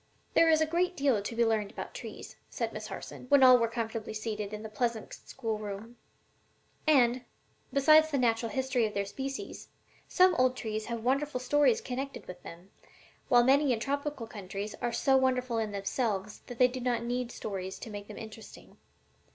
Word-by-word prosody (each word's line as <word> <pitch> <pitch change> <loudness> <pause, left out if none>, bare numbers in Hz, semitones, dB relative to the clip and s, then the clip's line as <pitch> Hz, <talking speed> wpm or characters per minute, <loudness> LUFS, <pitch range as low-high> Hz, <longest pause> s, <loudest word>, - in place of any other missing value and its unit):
"There 330 - +5
is 315 -1 +4
a - - +4
great 355 +3 0
deal 270 -7 +2
to 215 +3 -5
be 235 0 +3
learned 215 -2 +1
about - - -7
trees," - - -9
said 230 -2 -3
Miss 215 0 -6
Harson, 210 +4 -8
when 280 -2 +6
all 255 -1 +8
were 230 - +2
comfortably 225 -2 -4
seated 215 -2 -4
in 210 0 -6
the - - -5
pleasant 220 +1 -2
schoolroom; 215 -1 -6 0.9
"and, 250 -4 +4 0.5
besides 310 +3 +6
the 285 - 0
natural 230 -2 +1
history 260 -3 +1
of 210 - -9
their 200 0 0
species, 270 +6 -6 0.4
some 370 0 +5
old 255 0 +3
trees 215 -1 -3
have 235 -2 -4
wonderful 275 +1 0
stories 290 - +3
connected 270 - -5
with 180 -1 -10
them, 175 +3 -12 0.6
while 240 -1 +6
many 275 +2 +4
in 225 - -2
tropical 280 0 -3
countries 200 -1 -6
are 240 -1 0
so 265 +3 +3
wonderful 255 -3 +1
in 220 -2 -2
themselves 205 0 -2
that 245 - -8
they 250 - +6
do 255 +1 -6
not 240 -2 -1
need 245 0 -2
stories 190 -2 -5
to 225 - -8
make 205 0 -7
them 210 - -9
interesting. 220 0 -11
235 Hz, 185 wpm, -30 LUFS, 215-265 Hz, 0.9 s, all